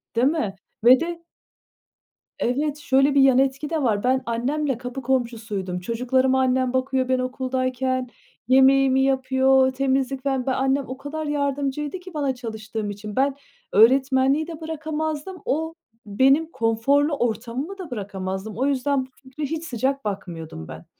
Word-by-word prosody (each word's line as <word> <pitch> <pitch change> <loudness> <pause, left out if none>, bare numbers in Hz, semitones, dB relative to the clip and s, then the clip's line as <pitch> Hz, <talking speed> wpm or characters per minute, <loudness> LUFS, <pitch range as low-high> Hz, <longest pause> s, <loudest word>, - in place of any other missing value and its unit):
Değil 245 +3 +4
mi? 255 -11 -1 0.3
Ve 250 +2 +8
de 335 0 -4 1.2
Evet. 290 +4 0
Şöyle 275 -1 +2
bir 275 - +6
yan 265 -2 +5
etki 270 +2 +1
de 315 -4 -1
var. 210 -3 +1
Ben 260 +1 +2
annemle 260 +3 -1
kapı 250 +1 -6
komşusuydum. 225 -8 -2
Çocuklarıma 255 +5 +1
annem 255 0 +1
bakıyor 260 0 0
ben 255 -1 +2
okuldayken. 255 0 -1 0.4
Yemeğimi 265 0 +5
yapıyor, 265 0 +3
temizlik, 270 0 0
falan. 270 -2 0
Ben 265 - 0
annem, 270 +1 +1
o 260 +1 -6
kadar 310 +2 -5
yardımcıydı 285 +2 -2
ki 365 -1 -12
bana 280 -3 -1
çalıştığım 220 -3 -5
için. 205 +1 -7
Ben 275 +1 +2 0.4
öğretmenliği 265 - +4
de 325 -1 -8
bırakamazdım. 315 +2 -4
O 320 +3 -1 0.3
benim 270 +10 +3
konforlu 275 +7 +2
ortamımı 245 - -3
da 350 -8 -8
bırakamazdım. 195 -1 -5
O 265 - +1
yüzden 275 -1 +1
bu - - -21
fikre 260 +3 -8
hiç 320 +3 -3
sıcak 265 0 -2
bakmıyordum 165 - -6
ben. - - -10
265 Hz, 145 wpm, -23 LUFS, 245-285 Hz, 1.2 s, Ve